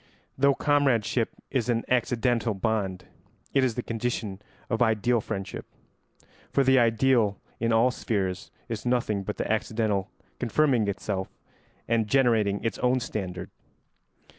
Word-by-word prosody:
] - - -38
Though 140 +1 +3
comradeship 130 -6 +2 0.2
is 125 -3 0
an 115 -1 +1
accidental 120 -2 +1
bond, 95 -2 -1 0.5
it 135 - +4
is 125 -4 +1
the 125 - -3
condition 115 -4 -3 0.3
of 115 0 -1
ideal 115 +1 +2
friendship, 100 -3 -5 0.8
for 140 - +3
the 130 0 +5
ideal, 115 -2 +3 0.2
in 115 0 +1
all 115 +3 +4
spheres, 95 -6 -2 0.2
is 115 -3 -4
nothing 120 -5 0
but 105 +2 -5
the - - -2
accidental 110 -2 0 0.3
confirming 125 -2 +2
itself 100 -1 -3 0.6
and 115 -2 +1
generating 110 -5 +2
its 115 -3 -2
own 125 +1 +2
standard. 95 -6 -5
115 Hz, 135 wpm, -27 LUFS, 105-125 Hz, 0.8 s, the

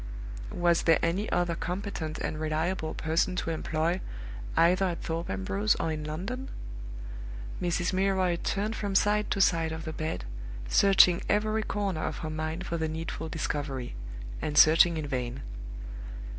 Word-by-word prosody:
Was 175 -1 +3
there 165 -1 +5
any 185 +6 0
other 175 -1 +2
competent 175 -3 -3
and 155 - -3
reliable 155 +2 -1
person 165 +3 +1
to 170 - -1
employ, 165 +2 0 0.6
either 180 +3 +5
at 175 -2 -2
Thorpe 165 +1 -2
Ambrose 95 +2 +1
or 165 - -1
in 155 -1 -3
London? 195 - -4 1.1
Mrs. 175 +1 0
Milroy 190 -2 +2
turned 210 +3 0
from 200 -2 -2
side 210 +2 +3
to - - 0
side 165 -4 +3
of 160 0 -5
the 160 - -4
bed, 155 - -3 0.4
searching 190 - +6
every 215 +1 +2
corner 200 -6 -1
of 155 - -2
her 155 - -3
mind 155 +3 -3
for 170 - -2
the 160 -1 -1
needful 160 0 -4
discovery, 140 -5 -3 0.5
and 150 -1 -2
searching 165 +2 +7
in 155 - -2
vain. 130 -2 -3
165 Hz, 150 wpm, -29 LUFS, 155-190 Hz, 1.1 s, searching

